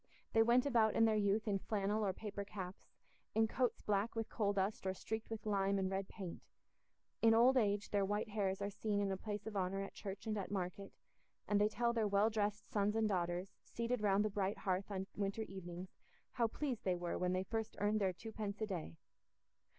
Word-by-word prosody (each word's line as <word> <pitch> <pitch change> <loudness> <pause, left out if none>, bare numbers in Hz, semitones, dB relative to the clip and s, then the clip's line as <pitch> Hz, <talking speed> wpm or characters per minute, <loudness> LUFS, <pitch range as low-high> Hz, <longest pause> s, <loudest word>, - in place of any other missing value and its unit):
They 225 - +6
went 240 +3 +5
about 230 -6 +3
in 225 - +6
their 220 - +4
youth 210 +1 +2
in 200 -2 +1
flannel 210 +1 0
or 195 - +2
paper 200 +1 -5
caps, 190 -2 -7 0.5
in 220 0 +4
coats 250 +2 0
black 210 +2 +1
with 225 0 -2
coal 205 -3 +1
dust 195 0 -1
or 190 - 0
streaked 220 +3 -4
with 220 -1 -5
lime 200 -1 +2
and 190 -1 0
red 195 0 -1
paint; 190 -5 -7 0.8
in 225 0 +6
old 245 +3 +6
age 205 -4 +2
their 205 -1 +3
white 205 +2 -1
hairs 200 -2 -1
are 200 - -2
seen 205 0 -1
in 200 -1 +1
a - - 0
place 205 +1 -5
of 220 -1 -5
honour 195 +1 0
at 195 - -7
church 195 -1 -6
and 215 -1 -1
at 195 - -4
market, 195 0 -3 0.6
and 205 0 +3
they 210 - +4
tell 235 +2 +1
their 225 -2 +2
well 205 +2 +3
dressed 210 -1 -1
sons 205 0 +2
and 220 -1 +2
daughters, 180 +1 -1
seated 235 0 -2
round 205 0 +3
the 215 - 0
bright 200 0 0
hearth 190 0 -1
on 190 -2 -2
winter 200 +2 -1
evenings, 180 -2 -7 0.4
how 235 -2 +2
pleased 255 0 -3
they 185 -2 +2
were 175 -1 -2
when 180 0 +1
they 185 0 +1
first 220 +2 -3
earned 210 +1 +2
their 190 -1 +3
twopence 210 +1 -5
a 220 - 0
day. 175 - -4
205 Hz, 215 wpm, -38 LUFS, 195-220 Hz, 0.8 s, They